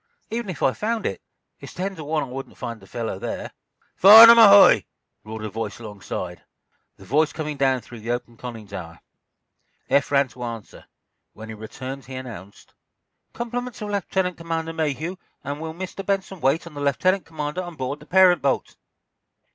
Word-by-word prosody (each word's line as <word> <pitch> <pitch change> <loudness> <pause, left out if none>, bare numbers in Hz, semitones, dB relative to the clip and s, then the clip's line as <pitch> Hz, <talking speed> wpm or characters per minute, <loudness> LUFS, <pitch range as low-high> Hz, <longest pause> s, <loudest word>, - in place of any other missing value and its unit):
Even 230 -2 -3
if 165 -7 -5
I 130 - +3
found 225 +1 -2
it, - - -3 0.4
it's - - -11
ten 190 +2 -3
to 160 - -8
one 150 0 -1
I - - -4
wouldn't 135 +1 -8
find 115 -2 -6
the 95 - -17
fellow 115 -4 -5
there." - - -5 0.4
"'Farnum,' 225 +4 +10
ahoy!" 200 -3 +8 0.4
roared 110 0 -7
a - - -4
voice 115 +2 -5
alongside, 100 -5 -7 0.6
the 95 - -15
voice 150 +8 +2
coming 150 -2 -5
down 135 -2 +1
through 120 0 -12
the 110 +2 -8
open 120 -1 -3
conning 115 -2 -8
tower. 90 -5 -9 0.9
Eph 140 0 +2
ran 140 -1 +3
to 125 +1 -14
answer. 115 -3 -8 0.5
When 110 +1 -11
he - - -6
returned, 130 +5 -8
he 130 - -9
announced: 110 -7 -10 0.6
"Compliments 240 0 -5
of 205 - -5
Lieutenant 190 -2 -1
Commander 165 -1 -4
Mayhew, 160 +3 -3 0.3
and 145 +2 -5
will 160 0 -6
Mr. 190 +2 -6
Benson 195 -2 -2
wait 140 +6 +1
on 170 - -11
the 145 - -7
lieutenant 185 +7 +1
commander 155 +2 -4
on 175 -2 -8
board 135 +1 -4
the 150 - -16
parent 185 -1 +5
boat?" 140 -1 -1
145 Hz, 180 wpm, -23 LUFS, 120-185 Hz, 0.9 s, Farnum